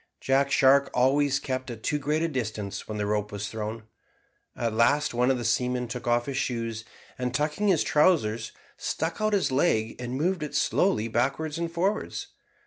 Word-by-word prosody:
Jack 135 +1 +2
Shark 135 +1 +5
always 135 +2 +3
kept 130 -2 -4
at 115 -2 -8
too 150 - 0
great 150 +3 0
a - - +2
distance 110 -8 -4
when 110 - -4
the 105 - -1
rope 105 0 -1
was 100 0 -4
thrown. 110 0 -5 0.7
At 115 -2 -1
last 120 +6 +3
one 125 +2 +2
of 135 - +2
the 120 - -4
seamen 125 +2 0
took 120 +1 -6
off 120 0 +2
his 140 -2 -4
shoes, 115 -5 -2 0.4
and, 125 0 -2
tucking 150 +9 0
up - - +5
his 165 - +2
trousers, 115 -9 +2 0.3
stuck 165 +6 -3
out 215 0 +1
his 195 -8 +2
leg 115 -6 +1
and 125 0 -4
moved 175 +4 0
it 150 - -5
slowly 180 - +2
backwards 140 +7 -1
and 170 -1 -2
forwards. 190 +5 -2
130 Hz, 190 wpm, -27 LUFS, 115-150 Hz, 0.7 s, Shark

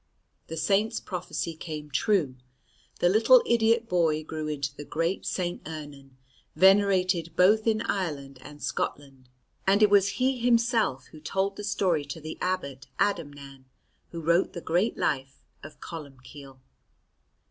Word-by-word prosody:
The 165 - -6
Saint's 195 +7 +1
prophecy 175 -2 -4
came 155 -2 -7
true. 160 - +1 0.7
The - - +5
little 230 - +6
idiot 230 0 +2
boy 165 -4 +1
grew 155 0 -5
into 140 -2 -3
the 145 - -8
great 165 +5 -2
St. 175 -1 -3
Ernan, 145 -4 -9 0.4
venerated 185 -4 +3
both 210 +5 +4
in 220 0 +2
Ireland 140 -9 -3
and 145 +2 -12
Scotland; 135 -3 -4 0.4
and 200 +2 +4
it 210 - +5
was 200 -1 +4
he 260 0 +1
himself 230 - +2
who 155 - -12
told 195 +5 -2
the 205 - -7
story 190 -6 0
to 145 +3 -7
the 155 0 -8
abbot 140 -8 -3
Adamnan 145 -8 -3 0.4
who 170 - -7
wrote 170 +3 +2
the 175 - -5
great 175 +8 0
life 135 -2 -2 0.2
of 155 - -12
Columbcille. 140 -3 -10
165 Hz, 140 wpm, -27 LUFS, 145-200 Hz, 0.7 s, little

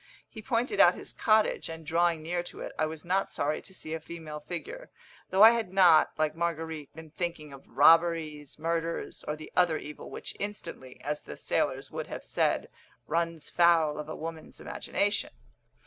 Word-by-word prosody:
He 220 - -10
pointed 245 - -1
out - - +7
his - - -9
cottage; 215 -5 +2
and, 160 -1 -8
drawing 165 0 +1
near 175 +2 -1
to 175 - -10
it, - - -5
I 155 - +2
was 160 +1 -7
not 190 +2 0
sorry 150 +1 -1
to - - -13
see 160 -4 -7
a 160 - -2
female 160 -2 -8
figure, 450 - -7 0.4
though 190 +2 +5
I 225 - +11
had 230 -5 -1
not, 180 -5 +6
like 155 0 0
Marguerite, 160 -3 -3
been 160 -1 -11
thinking 165 -4 -4
of 135 - -14
robberies, 155 +1 +3
murders, 165 +1 -3
or 150 - -1
the 155 0 -11
other 175 -3 +3
evil 150 0 -9
which - - -7
instantly, 170 -10 -6
as 150 +2 -3
the - - -9
sailors - - -1
would - - -5
have - - -7
said, - - 0 0.4
runs 165 -1 -2
foul 165 -3 +4
of 150 0 -6
a - - -4
woman's 160 0 -7
imagination. - - -1
165 Hz, 180 wpm, -29 LUFS, 155-175 Hz, 0.4 s, I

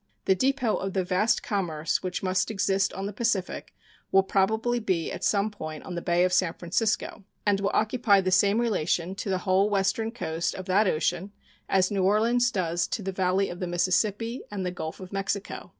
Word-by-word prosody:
The 190 - +5
depot 255 +2 +1
of 195 -1 -4
the 190 - +1
vast 185 +5 +1
commerce 165 -7 -1
which 185 0 -4
must 185 0 +1
exist 195 -2 +1
on 195 +1 -4
the 205 - -4
Pacific 210 -4 -2 0.4
will 195 0 +5
probably 220 +5 +1
be 185 -7 -1
at - - -6
some 205 +1 +2
point 155 -6 -7
on 185 - -7
the 170 - -3
Bay 175 +1 +2
of 185 0 +1
San 185 -2 +2
Francisco, 205 +4 -1 0.2
and 205 -1 +3
will 200 0 0
occupy 215 -2 +3
the 185 -1 0
same 200 +3 +4
relation 185 -6 0
to 195 - -5
the 190 - +1
whole 195 +2 +3
western 205 +3 0
coast 170 -8 -3
of 185 - -7
that 195 +3 +3
ocean 175 +3 -1 0.4
as 190 0 +2
New 200 -2 0
Orleans 230 +5 +3
does 175 -5 -1
to 210 - -3
the 195 - -2
valley 190 +1 +1
of 175 - -7
the 180 - -3
Mississippi 205 +7 0
and 195 -3 -4
the 180 - -1
Gulf 160 -3 -6
of 185 0 -10
Mexico. 195 0 -3
195 Hz, 200 wpm, -27 LUFS, 180-210 Hz, 0.4 s, The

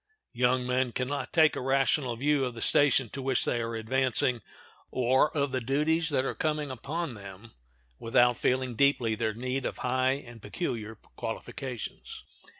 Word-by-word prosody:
Young 125 +1 +1
men 125 -1 0
can 125 - -2
not 145 +1 -4
take 160 -2 +4
a - - -3
rational 135 -1 +1
view 140 +3 +1
of 125 -2 -3
the - - -7
station 140 -3 +4
to 135 - -6
which 130 -1 +1
they 120 - 0
are 115 0 -3
advancing, 125 +1 +1 0.5
or 130 +4 +2
of 140 -1 +1
the 130 0 -1
duties 155 +6 +1
that 135 -3 +1
are - - -1
coming 150 -2 -2
upon 145 +4 -4
them, 100 +1 -11 0.5
without 120 +1 +3
feeling 130 -1 0
deeply 125 -2 +2
their 110 -1 -2
need 130 +3 -3
of - - -4
high 130 +1 +2
and 120 -5 -9
peculiar 110 -8 -4
qualifications. 120 +3 -7
130 Hz, 165 wpm, -28 LUFS, 120-140 Hz, 0.5 s, take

